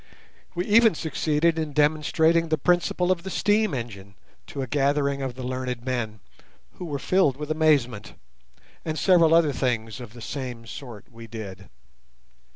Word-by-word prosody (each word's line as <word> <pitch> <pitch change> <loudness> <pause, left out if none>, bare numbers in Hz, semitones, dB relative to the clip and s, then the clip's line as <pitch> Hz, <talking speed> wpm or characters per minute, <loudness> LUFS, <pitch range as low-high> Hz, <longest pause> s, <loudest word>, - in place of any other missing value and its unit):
We 175 +1 -1
even 225 -2 +5
succeeded 160 +1 0
in 155 -2 -3
demonstrating 160 +2 +2
the 155 - +2
principle 180 +3 +1
of 180 -2 0
the 190 - -6
steam 210 +2 +2
engine 100 -5 -7 0.3
to 135 - -4
a - - -5
gathering 140 +1 +1
of 130 -2 -4
the 130 - -7
learned 125 -1 -4
men, 115 -5 -3 0.6
who 180 - -5
were 145 -4 -3
filled 145 -3 +2
with 150 +1 -5
amazement; 140 -9 +1 0.7
and 155 -1 -3
several 170 -3 +4
other 160 -4 +4
things 115 -3 -2
of 120 -2 -10
the 120 - -12
same 125 -2 -6
sort 115 -3 -10
we 115 0 -11
did. 100 -4 -8
140 Hz, 160 wpm, -25 LUFS, 120-160 Hz, 0.7 s, even